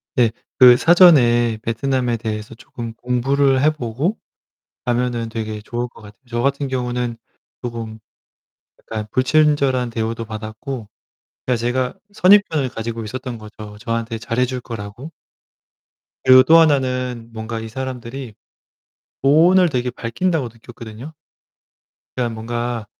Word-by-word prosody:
네. 120 -3 +4 0.3
그 125 -1 +9
사전에 125 -9 +5
베트남에 120 +1 -1
대해서 110 0 -5
조금 115 -1 -8
공부를 130 +2 +1
해보고 150 - 0 0.7
가면은 120 -1 0
되게 110 -1 -5
좋을 120 +3 -4
것 - - -17
같아요. 105 +2 -15
저 120 0 -2
같은 140 +2 0
경우는 125 -2 -2 0.4
조금 115 -2 -6 0.8
약간 110 -1 -6
불친절한 135 -2 +2
대우도 115 0 -3
받았고 110 +2 -7 0.6
그니까 125 -1 +2
제가 125 +2 -1 0.2
선입견을 185 -9 +4
가지고 115 0 -5
있었던 125 +1 -6
거죠. 105 -1 -11
저한테 115 +1 -3
잘해줄 125 +2 -1
거라고. 115 +4 -8 1.1
그리고 130 0 +8
또 160 +5 +6
하나는 125 -6 +1
뭔가 110 0 -5
이 110 - -6
사람들이 130 -1 -6 0.9
돈을 170 +6 +5
되게 125 -3 -1
밝힌다고 125 +4 -2
느꼈거든요. 115 +4 -11 1.0
그냥 120 -2 -1
뭔가 120 0 -3
120 Hz, 280 characters per minute, -20 LUFS, 115-130 Hz, 1.1 s, 그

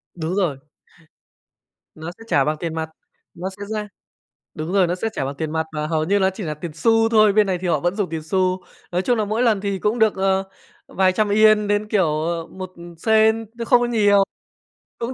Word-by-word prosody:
Đúng 165 +2 -3
rồi. 175 -9 0 1.4
Nó 160 +2 -7
sẽ - - -13
trả 140 - +3
bằng 155 +1 -1
tiền 165 -2 -3
mặt, 160 0 -3 0.4
nó 180 +2 -5
sẽ 200 +1 -9
ra 210 0 -4 0.7
đúng 155 +4 -5
rồi, 190 -3 +4
nó 175 - -1
sẽ 205 +5 -2
trả 135 - -3
bằng 135 +1 -4
tiền 155 +2 -4
mặt 160 0 -1
và 150 0 -3
hầu 155 -1 0
như 200 +4 +2
nó 190 -1 +2
chỉ 190 +3 -8
là 155 -4 -3
tiền 160 +2 -7
xu 225 +5 +3
thôi, 215 -2 +5
bên 210 0 +4
này 185 -2 -1
thì 185 - -3
họ 155 -4 +1
vẫn 175 +4 -1
dùng 205 -4 -1
tiền 160 -1 -4
xu. 185 +3 0 0.3
Nói 180 +1 0
chung 240 +3 +1
là 215 - +1
mỗi 215 +4 -1
lần 220 -5 +2
thì 200 -1 -2
cũng 210 +5 0
được, 220 -2 +3
ờ, 190 0 +1 0.4
vài 185 -1 +2
trăm 210 +3 +1
Yên 215 0 +4
đến, 205 +1 0
kiểu, 205 -3 +2 0.2
ờ, 165 +1 -2
một 185 -1 -9 0.3
Sen 220 +3 +3
chứ 230 - -3
không 245 +1 +4
có 245 - +1
nhiều, 205 -4 +4 0.8
cũng 235 +2 -3
190 Hz, 230 wpm, -21 LUFS, 170-215 Hz, 1.4 s, thôi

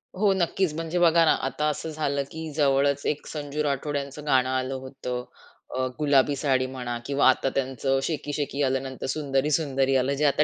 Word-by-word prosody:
हो, 200 +1 +3
नक्कीच 185 -2 0
म्हणजे 165 +2 -2
बघा 170 -1 +5
ना, - - +5
आता 150 +3 -2
असं 150 +2 -4
झालं 140 -3 -1
की 160 0 -6
जवळच 140 -1 +2
एक 150 - -1
संजू 150 0 -3
राठोड 145 0 -1
यांचं 140 +1 -6
गाणं 130 -3 +3
आलं 130 0 -1
होतं 130 -2 -5 0.5
अ, 130 0 0
गुलाबी 145 -1 +3
साडी 135 -2 +1
म्हणा, 125 -2 -4
किंवा 140 +1 +3
आता 130 +1 +2
त्यांचं 135 0 0
शेकी 150 -2 -3
शेकी 145 -1 -2
आलं, 135 0 +1
नंतर 130 -1 -6
सुंदरी 140 -1 0
सुंदरी 135 -3 +1
आलं, 130 +1 +2
जे 150 +2 +1
आता 145 +1 +4
140 Hz, 190 wpm, -26 LUFS, 135-150 Hz, 0.5 s, बघा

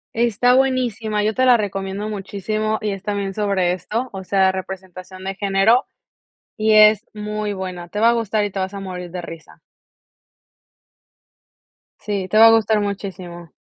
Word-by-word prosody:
Está 240 +2 +3
buenísima, 235 -5 0
yo 215 +1 +1
te 255 +4 +1
la 250 -1 +6
recomiendo 200 -1 -3
muchísimo 215 +2 -3
y 215 - -2
es 195 -1 -6
también 200 -1 -3
sobre 195 -3 0
esto, 220 +8 -3
o 190 -1 -8
sea, 190 0 +3
representación 185 0 -8
de 195 0 -4
género 200 +5 +2 0.7
y 220 0 +2
es 215 0 +6
muy 210 0 -4
buena, 185 -2 -6
te 205 +5 -4
va 230 - +6
a - - +5
gustar 220 -2 0
y 205 - -3
te 195 - -5
vas 190 +1 -3
a 200 - -6
morir 180 -2 -7
de 180 +1 -6
risa. 165 -2 -11 2.4
Sí, 200 -3 -3
te 215 - +1
va 225 +1 +9
a - - +7
gustar 220 -1 +3
muchísimo. 185 -4 -6
205 Hz, 165 wpm, -20 LUFS, 190-215 Hz, 2.4 s, va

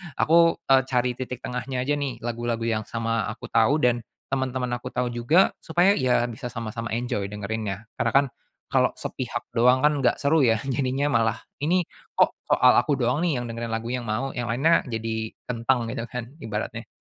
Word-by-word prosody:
aku, 165 +1 +5 0.2
eee, 135 0 +7
cari 125 -1 +1
titik 125 -1 -5
tengahnya 125 +1 -3
aja 145 +2 0
nih, 135 -4 -2
lagu-lagu 120 -1 -2
yang 110 -2 0
sama 115 -2 -1
aku 110 - -7
tahu 115 +5 +4
dan 120 -1 +3 0.3
teman-teman 130 -1 -1
aku 120 - -7
tahu 125 0 -1
juga. 120 +10 +3
Supaya, 175 +5 +3
iya 125 -2 +2
bisa 120 +1 -6
sama-sama 115 0 -5
enjoy 110 -4 -2
dengerinnya. 105 0 -4
Karena - - 0
kan 140 +1 +5 0.4
kalau - - +2
sepihak - - -4
doang 125 +2 +5
kan 145 -1 +2
nggak - - +2
seru 145 0 +3
ya, 115 -2 +3
jadinya 135 +2 0
malah, 115 -5 +1 0.2
ini 175 +3 +2 0.3
kok - - +4
soal - - +5
aku 140 -3 +2
doang 125 +7 +1
nih, 155 -8 +1
yang 120 - -4
dengerin 115 0 -5
lagu 115 +1 -3
yang 125 0 -2
mau, 120 +4 -2
yang 120 -1 -2
lainnya 150 +8 +3
jadi 110 -2 -3 0.2
kentang 120 0 0
gitu 115 0 -4
kan, 125 -2 -4 0.2
ibaratnya. 110 +1 -4
120 Hz, 185 wpm, -25 LUFS, 115-135 Hz, 0.4 s, eee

